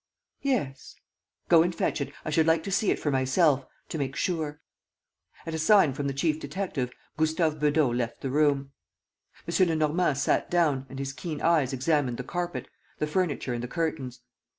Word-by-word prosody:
"Yes." 200 Hz, -, -2 dB, 0.5 s
"Go 165 Hz, -2 st, +7 dB
and 175 Hz, +1 st, 0 dB
fetch 155 Hz, -, -1 dB
it.... 140 Hz, 0 st, -3 dB
I -, -, -2 dB
should 160 Hz, +1 st, +3 dB
like 160 Hz, 0 st, +3 dB
to 195 Hz, -, -4 dB
see 200 Hz, +1 st, +2 dB
it -, -, +2 dB
for 145 Hz, -, -1 dB
myself... 135 Hz, +1 st, +2 dB, 0.2 s
to 160 Hz, -, -4 dB
make 140 Hz, -1 st, -2 dB
sure... 155 Hz, -5 st, -2 dB, 0.4 s
." -, -, -29 dB
At 165 Hz, -, -4 dB
a 160 Hz, -, -2 dB
sign 160 Hz, -3 st, +5 dB
from 140 Hz, +1 st, -3 dB
the 140 Hz, -, -1 dB
chief 155 Hz, +2 st, +1 dB
detective, 145 Hz, -5 st, -3 dB, 0.3 s
Gustave 155 Hz, 0 st, +1 dB
Beudot 150 Hz, -4 st, +2 dB
left 120 Hz, -1 st, -3 dB
the 135 Hz, -, -3 dB
room. 140 Hz, -1 st, +2 dB, 0.8 s
M. 180 Hz, +2 st, +3 dB
Lenormand 155 Hz, -1 st, +1 dB
sat -, -, +1 dB
down 150 Hz, -6 st, +1 dB
and 135 Hz, -, -8 dB
his 135 Hz, 0 st, -4 dB
keen 150 Hz, +2 st, -5 dB
eyes 155 Hz, -6 st, +3 dB
examined 135 Hz, -2 st, 0 dB
the 125 Hz, -, -4 dB
carpet, 175 Hz, +4 st, -4 dB, 0.3 s
the -, -, 0 dB
furniture 150 Hz, -5 st, -1 dB
and 120 Hz, -, -3 dB
the 125 Hz, -, -4 dB
curtains. 145 Hz, -5 st, -3 dB
150 Hz, 185 wpm, -27 LUFS, 135-165 Hz, 0.8 s, Go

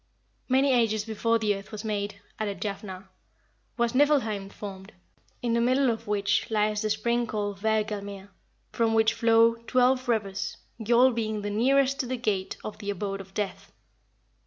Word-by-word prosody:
'" -, -, -43 dB
"Many 265 Hz, +1 st, +4 dB
ages 220 Hz, -3 st, +2 dB
before 230 Hz, +1 st, +1 dB
the 215 Hz, -2 st, +1 dB
earth 195 Hz, 0 st, -10 dB
was 215 Hz, 0 st, -6 dB
made," 205 Hz, -1 st, -3 dB, 0.2 s
added 205 Hz, -2 st, -3 dB
Jafnhar, 195 Hz, -2 st, -5 dB, 0.7 s
"was 235 Hz, 0 st, +1 dB
Niflheim 255 Hz, -8 st, +2 dB
formed, 195 Hz, 0 st, -9 dB, 0.5 s
in 235 Hz, -1 st, +1 dB
the 235 Hz, -, +2 dB
middle 255 Hz, +1 st, +3 dB
of 225 Hz, -, -6 dB
which 205 Hz, +2 st, +1 dB
lies 210 Hz, -1 st, +1 dB
the 215 Hz, -, -1 dB
spring 235 Hz, +3 st, 0 dB
called 205 Hz, -2 st, -3 dB
Hvergelmir, 205 Hz, -2 st, -2 dB, 0.4 s
from 225 Hz, -1 st, +1 dB
which 220 Hz, 0 st, +4 dB
flow 230 Hz, 0 st, +4 dB
twelve 255 Hz, +1 st, +3 dB
rivers, 200 Hz, -4 st, -1 dB, 0.2 s
Gjoll 240 Hz, +3 st, +4 dB
being 220 Hz, -2 st, -2 dB
the 205 Hz, -, -2 dB
nearest 270 Hz, +5 st, +2 dB
to 255 Hz, -, -1 dB
the 255 Hz, +1 st, -2 dB
gate 200 Hz, -5 st, -2 dB
of 210 Hz, 0 st, -7 dB
the 205 Hz, -2 st, -5 dB
abode 195 Hz, 0 st, -3 dB
of 190 Hz, 0 st, -15 dB
death." 205 Hz, -2 st, -4 dB
215 Hz, 165 wpm, -27 LUFS, 205-235 Hz, 0.7 s, Many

